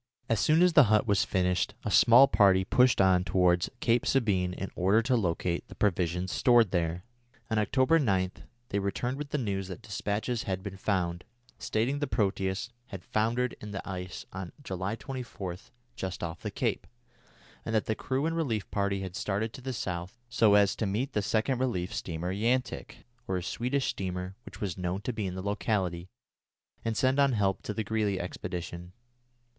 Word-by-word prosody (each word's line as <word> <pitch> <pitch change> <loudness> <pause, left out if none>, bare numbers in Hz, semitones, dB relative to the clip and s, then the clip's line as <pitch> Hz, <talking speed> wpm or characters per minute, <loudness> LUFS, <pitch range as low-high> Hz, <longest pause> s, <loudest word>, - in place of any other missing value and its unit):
As 115 - +1
soon 155 - +4
as 180 -1 +4
the 150 -3 +8
hut 105 0 +3
was 100 -2 +2
finished, 90 -2 0
a - - -1
small 125 +4 +8
party 95 -6 +4
pushed 125 +4 +4
on 95 -2 +4
towards 90 0 +2
Cape 120 +1 +3
Sabine 100 -9 +1
in 95 +1 -5
order 100 +5 +3
to 130 +2 +2
locate 85 -4 -1
the - - -12
provisions 90 -2 0
stored 120 -6 +4
there. 85 0 -1 0.5
On 110 - +2
October 130 +9 +3
9 95 - +1 0.4
they 100 - 0
returned 120 +6 -2
with 150 -1 -5
the 150 - -1
news 100 -7 -2
that 95 - -8
despatches 105 +3 -2
had 95 -4 -3
been 100 -1 -6
found, 90 -3 -1 0.4
stating 125 +6 0
the 145 - -1
Proteus 100 +1 -1 0.2
had 95 -6 -8
foundered 115 +3 0
in 105 -1 -7
the 95 - -5
ice 90 -1 -6
on 95 -2 -6
July 95 -1 -3
24 115 -7 -6 0.4
just 95 -2 -5
off 85 -1 -5
the - - -3
cape, - - -2 0.8
and 110 - -2
that 110 - +2
the 110 - 0
crew 130 +5 -2
and 165 0 0
relief 120 -11 -2
party 100 -1 0
had 95 -2 -6
started 110 +1 -2
to 135 - -9
the 130 +1 -4
south 90 -5 -4
so 110 -4 +4
as 100 -1 +4
to 110 - -1
meet 120 +8 -2
the 105 - +1
second 110 +5 0
relief 95 -9 -1
steamer 85 +2 -3
Yantic, 120 +6 -1 0.2
or 95 - 0
a 90 - -4
Swedish 125 +9 -1
steamer 90 0 -4
which - - -11
was 95 -4 -3
known 90 +1 -2
to 125 - -3
be 105 -3 -2
in 90 - -5
the 95 - -5
locality, 95 -4 -1 0.8
and 115 -1 -1
send 130 +2 +2
on 140 -2 +4
help 100 -3 +1
to - - -4
the 110 +1 -2
Greely 105 -2 0
expedition. 90 0 -6
100 Hz, 185 wpm, -29 LUFS, 95-115 Hz, 0.8 s, the